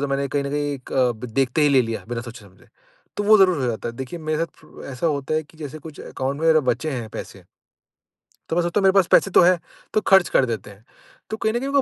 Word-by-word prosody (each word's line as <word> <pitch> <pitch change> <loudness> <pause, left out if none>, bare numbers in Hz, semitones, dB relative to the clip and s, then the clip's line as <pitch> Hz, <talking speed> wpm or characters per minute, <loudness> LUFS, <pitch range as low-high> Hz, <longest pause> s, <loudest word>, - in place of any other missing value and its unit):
तो 140 - -1
मैंने 140 0 -1
कहीं 145 +1 -1
न 140 - -3
कहीं 145 0 -1
एक 130 - -11
अब 125 -3 +1
देखते 130 +5 0
ही 145 - +5
ले 135 -2 +4
लिया, 115 -1 -5
बिना 120 -1 -3
सोचे-समझे, 110 -5 -13 0.5
तो 205 - -2
वो 215 +1 +6
ज़रूर 185 -4 +4
हो - - 0
जाता 115 -2 -3
है। 115 - -8
देखिए 130 +7 -6
मेरे 155 -1 -2
साथ 165 - 0 0.2
फ़ 155 - -13
ऐसा 130 +6 -2
होता 145 -1 -1
है 155 - +1
कि 155 +1 -22
जैसे 155 0 -7
कुछ 155 -1 -11
अकाउंट 135 +2 -4
में 165 - +2
अगर 160 -1 +5
बचे 160 - -4
हैं 120 -5 -4
पैसे। - - -9 1.1
तो 160 - -1
मैं 175 - +3
सोचता 175 +4 0
हूँ - - -1
मेरे 190 - +6
पास 195 -3 +4
पैसे 195 - +4
तो - - +6
हैं, 180 0 +4 0.3
तो 215 - +2
खर्च 190 -3 +4
कर 130 - +3
देते 115 -3 -5
हैं। 100 +2 -16 0.4
तो 220 - -4
कहीं 220 - 0
न 240 - 0
कहीं 270 +2 -3
मेरे 280 -1 +4
145 Hz, 275 wpm, -22 LUFS, 125-170 Hz, 1.1 s, वो